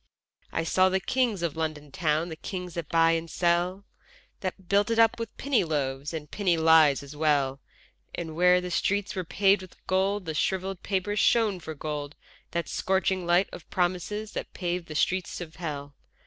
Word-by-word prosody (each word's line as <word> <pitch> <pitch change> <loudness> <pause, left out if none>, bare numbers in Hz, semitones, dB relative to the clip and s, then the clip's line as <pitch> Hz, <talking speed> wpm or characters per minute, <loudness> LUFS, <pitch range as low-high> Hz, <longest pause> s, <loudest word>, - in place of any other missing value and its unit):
I 165 - -1
saw 185 +3 +3
the 190 +1 +1
kings 235 -4 0
of 165 -3 -1
London 155 -3 -3
town, 155 +2 0
The 160 - -5
kings 180 +1 -6
that 170 -3 -5
buy 165 0 +4
and 165 0 -1
sell, 175 +3 0 0.5
That 185 -1 -5
built 200 +2 +3
it 230 - +1
up 225 0 +4
with 230 -2 -6
penny 275 -6 +2
loaves 140 -3 -2
And 155 -3 -6
penny 185 -5 +1
lies 160 -3 +5
as 140 +1 -10
well: 140 -3 +1 0.5
And 160 -2 -5
where 180 +1 +5
the 180 0 -5
streets 200 +3 0
were 185 - -2
paved 195 +3 +3
with 185 - -14
gold, 195 +1 +1
the 160 - -3
shrivelled 190 +3 -1
paper 195 +1 -1
shone 210 -2 +3
for 160 -2 -7
gold, 150 0 -5 0.3
The 170 0 -1
scorching 190 -1 0
light 175 +3 +4
of 170 - -10
promises 185 +4 -1
that - - -6
pave 175 -1 -2
the 155 - -7
streets 185 +3 0
of 165 -3 -8
hell. 145 -4 -5
175 Hz, 185 wpm, -27 LUFS, 160-190 Hz, 0.5 s, lies